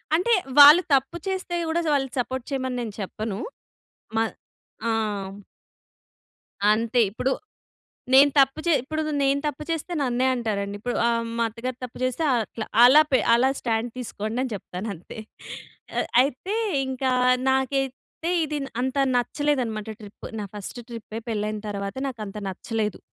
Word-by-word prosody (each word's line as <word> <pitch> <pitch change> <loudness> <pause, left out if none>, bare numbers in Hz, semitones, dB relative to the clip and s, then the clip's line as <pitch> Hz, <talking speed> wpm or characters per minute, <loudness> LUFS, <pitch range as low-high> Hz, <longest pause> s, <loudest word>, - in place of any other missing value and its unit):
అంటే 365 +8 +2 0.3
వాళ్ళు 295 +5 +11
తప్పు 270 +6 +2
చేస్తే 375 -2 -2
కూడా 335 +2 +1
వాళ్ళని 270 -3 0
సపోర్ట్ 260 0 -3
చేయమని 260 -2 -2
నేను 220 -3 -5
చెప్పను. 205 +1 -4 0.8
మ - - +3 0.7
ఆ! - - +2 1.8
అంతే 230 +3 +1
ఇప్పుడు. 255 +4 -1 0.8
నేను 280 +2 +8
తప్పు 270 +2 +4
చే 340 - +4
ఇప్పుడు 310 +4 -3 0.2
నేను 275 +1 +2
తప్పు 295 0 -3
చేస్తే 330 +2 -3
నన్నే 255 -1 +1
అంటారండి. 205 -4 -2
ఇప్పుడు 245 +2 -2
ఆహ్, 230 0 +1
మా 230 - +2
అత్తగారు 245 +3 -6
తప్పు 245 - -9
చేస్తే 255 +5 0
అట్లా 225 -1 -3 0.2
అలా 260 +5 +9
పె 260 - +6 0.2
అలా 250 +3 +4
స్టాండ్ 230 0 -1
తీసుకోండి. 220 -1 -4
అని 255 - -3
చెప్తాను 190 +1 -6
అంతే. 175 0 -12 1.1
అయితే 285 - -3 0.3
ఇంకా 260 0 -1 0.4
నాకైతే 270 +4 -2
ఇది 300 -1 -3 0.2
అంతా 265 +2 +1
నచ్చలేదన్నమాట. 245 -5 -1
ట్రిప్. 205 0 -10
నా - - -3
ఫస్ట్ 210 +4 -7
ట్రిప్పే 225 -1 -7
పెళ్ళయిన 215 0 -2
తర్వాత 200 +1 -4
నాకు 245 -4 -8
అంతా 195 +1 -7
నచ్చలేదు. 210 +1 -3
250 Hz, 135 wpm, -25 LUFS, 220-275 Hz, 1.8 s, వాళ్ళు